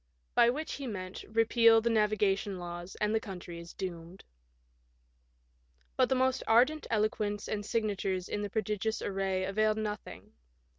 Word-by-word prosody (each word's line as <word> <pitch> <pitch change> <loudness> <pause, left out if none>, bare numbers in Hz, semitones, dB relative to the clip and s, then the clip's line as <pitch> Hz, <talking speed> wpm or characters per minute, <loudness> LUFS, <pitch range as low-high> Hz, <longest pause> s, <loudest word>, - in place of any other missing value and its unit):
" - - -44
By 235 - +6
which 300 +6 -2
he 275 -2 -5
meant, 185 -4 -6
repeal 225 +1 +5
the 230 +1 0
navigation 205 -2 +1
laws 175 +1 -7
and 210 +1 0
the 220 - +3
country 180 -5 -8
is 170 0 -11
doomed. 175 0 -7 1.7
But - - +3
the 265 - +3
most 260 0 +2
ardent 260 +7 +4
eloquence 210 -2 0
and 205 -1 -2
signatures 200 -4 -1
in 205 0 -3
pro 220 +2 -1
digious 215 +2 -2
array 190 -1 -1
availed 215 +3 +1
nothing. 210 -2 -5
210 Hz, 150 wpm, -31 LUFS, 190-225 Hz, 1.7 s, By